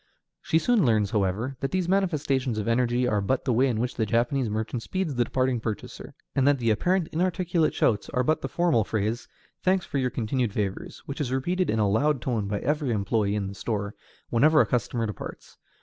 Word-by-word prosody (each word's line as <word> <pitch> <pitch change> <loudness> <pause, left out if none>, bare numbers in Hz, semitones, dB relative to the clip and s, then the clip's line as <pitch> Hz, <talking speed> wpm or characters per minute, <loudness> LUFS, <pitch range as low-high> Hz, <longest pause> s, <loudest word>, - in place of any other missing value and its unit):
She 160 - +1
soon 230 +3 +3
learns, 110 -5 +2
however, 105 +6 -1
that 135 - -2
these 185 -2 -1
manifestations 150 - 0
of 105 - -2
energy 120 +1 +2
are 105 -4 +1
but 125 +6 -1
the 130 - +2
way 130 +4 +3
in 115 -4 -1
which 125 +2 -1
the 110 - -1
Japanese 120 +2 +1
merchant 110 +3 -3
speeds 185 +2 -2
the 120 -1 +2
departing 130 +1 0
purchaser, 110 -1 -6 0.2
and 135 0 +2
that 145 -1 +4
the 115 -3 +1
apparently 175 - +1
inarticulate 175 -1 +1
shouts 105 -4 +1
are 125 - 0
but 155 +5 +1
the - - -4
formal 170 -10 +2
phrase, 110 +3 -2 0.3
"Thanks 185 -1 +2
for 140 - -2
your 130 -1 +1
continued 120 -2 -1
favors," 100 -3 -4
which 140 +2 -5
is 130 -4 -2
repeated 175 +8 0
in 110 - +1
a 105 -2 +2
loud 135 +8 +2
tone 115 -5 -2
by 100 0 -1
every 150 -2 0
employee 105 -1 0
in 105 -2 -1
the 95 - -5
store 100 0 -3 0.4
whenever 155 +6 +5
a - - +6
customer 120 -1 -1
departs. 105 -4 -8
125 Hz, 210 wpm, -26 LUFS, 110-150 Hz, 0.4 s, a